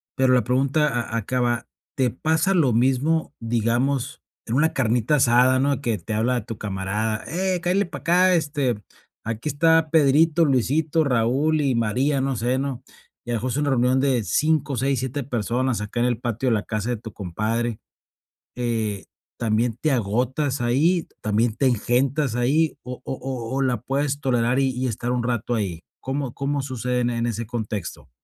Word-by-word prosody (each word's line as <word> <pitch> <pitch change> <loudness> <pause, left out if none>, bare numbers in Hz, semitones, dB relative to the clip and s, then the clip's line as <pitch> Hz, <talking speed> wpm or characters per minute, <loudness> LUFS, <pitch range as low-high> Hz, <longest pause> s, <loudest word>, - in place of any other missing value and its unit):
Pero 130 -1 +3
la 125 - +4
pregunta 140 +4 +2 0.2
a 115 - -1
acaba, 120 +1 -1 0.3
¿te 130 -2 +2
pasa 160 - +1
lo 155 -9 +3
mismo, 135 +7 +1
digamos, 120 +4 -1 0.2
en 115 - -2
una 155 +4 +2
carnita 120 +2 +1
asada, 130 -1 +4
no?, 140 +1 +1
que 115 -6 0
te 100 +5 -6
habla 120 +1 0
tu 115 -3 -6
camarada: 105 +2 -2
"Ey, 185 +2 -1
cáele 185 +3 +1
para 160 -5 -8
acá, 180 +4 +4
este, 140 -9 -1 0.4
aquí 115 +3 -4
está 160 +1 +3
Pedrito, 160 +2 +4
Luisito, 145 +4 +1
Raúl 140 +4 +1
y 140 -3 +1
María", 125 +6 +1
no 135 0 -1
sé, 125 +3 0
¿no? 135 -2 -4 0.4
Y, 120 - -4
a - - +1
lo - - +1
mejor, 125 +4 -3
es 130 - -2
una 145 -1 +1
reunión 130 0 +2
de 135 -3 +2
5, 150 0 +1
6, 135 +2 0
7 130 +2 -3
personas, 125 0 -1
acá, 105 +3 -3
en 120 - +3
el 120 -3 -1
patio 120 +1 -1
de 115 - +3
la 105 - -1
casa 110 +1 -3
de 120 - -1
tu 110 -1 -10
compadre, 110 +5 -2 0.8
eh, 115 -5 -2 0.3
¿también 115 0 0
te 155 - +2
agotas 130 +5 0
ahí, 155 +9 +2
también 110 +1 +1
te 135 - +1
engentas 125 +3 +1
ahí 145 +6 +1
o 125 -1 -7
o - - -4
o 130 -3 -5
o - - +1
la 125 -3 0
puedes 140 +2 -1
tolerar 125 -1 +1
y 135 -1 +2
y 130 +1 -2
estar 120 +2 -3
un 125 -1 0
rato 120 0 -1
ahí? 95 -7 -3 0.2
¿Cómo 135 -1 -3
cómo 140 +1 -2
sucede 125 -2 -2
en 120 - +1
e 120 - -2
en 115 0 0
ese 115 0 -3
contexto? 110 - -5
125 Hz, 185 wpm, -23 LUFS, 115-140 Hz, 0.8 s, la